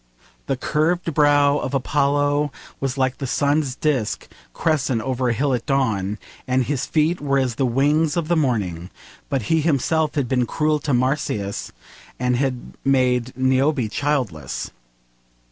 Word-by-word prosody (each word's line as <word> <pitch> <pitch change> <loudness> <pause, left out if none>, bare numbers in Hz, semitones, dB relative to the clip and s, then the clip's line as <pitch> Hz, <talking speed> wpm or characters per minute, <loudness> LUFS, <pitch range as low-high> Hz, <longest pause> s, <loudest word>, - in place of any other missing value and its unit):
The 135 - 0
curved 165 +4 0
brow 145 -1 +4
of - - -3
Apollo 145 +2 +1 0.3
was 135 -1 -2
like 130 -1 0
the 135 - -3
sun's 145 0 +1
disc 135 -7 -1 0.2
crescent 140 - 0
over 130 -1 -1
a - - +2
hill 135 +4 0
at 120 - -2
dawn, 110 -8 0 0.3
and 130 0 +2
his 135 +1 -2
feet 160 +2 +1
were 140 -1 +1
as 130 -3 +1
the 130 +2 0
wings 145 +6 +2
of 165 -3 -1
the 175 - +2
morning, 100 - -1 0.4
but 135 -4 -1
he 160 +8 +2
himself 155 +1 +1
had 140 -4 0
been 125 -1 +1
cruel 150 -1 +1
to 145 -1 -2
Marsyas 125 -6 -1 0.5
and 125 0 +1
had 130 -1 -2
made 125 -2 +1
Niobe 130 -2 +2
childless. 125 - -2
135 Hz, 150 wpm, -22 LUFS, 125-150 Hz, 0.5 s, brow